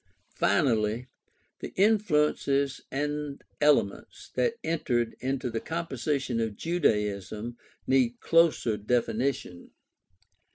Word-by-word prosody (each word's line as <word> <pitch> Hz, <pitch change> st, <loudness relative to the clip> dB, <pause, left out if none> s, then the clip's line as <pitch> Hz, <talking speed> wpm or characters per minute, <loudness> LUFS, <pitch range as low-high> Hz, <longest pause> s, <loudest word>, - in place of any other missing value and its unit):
Finally, 110 Hz, +2 st, +1 dB, 0.5 s
the -, -, -7 dB
influences 150 Hz, -9 st, +2 dB
and 145 Hz, 0 st, -3 dB, 0.2 s
elements 145 Hz, -9 st, +1 dB
that 470 Hz, -1 st, +1 dB
entered 120 Hz, -8 st, 0 dB
into 130 Hz, 0 st, -2 dB
the 115 Hz, -, -2 dB
composition 140 Hz, -6 st, -2 dB
of 110 Hz, -2 st, -1 dB
Judaism 110 Hz, -, -1 dB, 0.3 s
need 125 Hz, -2 st, +2 dB
closer 165 Hz, -10 st, +3 dB
definition. 115 Hz, -3 st, -1 dB
130 Hz, 85 wpm, -28 LUFS, 115-150 Hz, 0.5 s, closer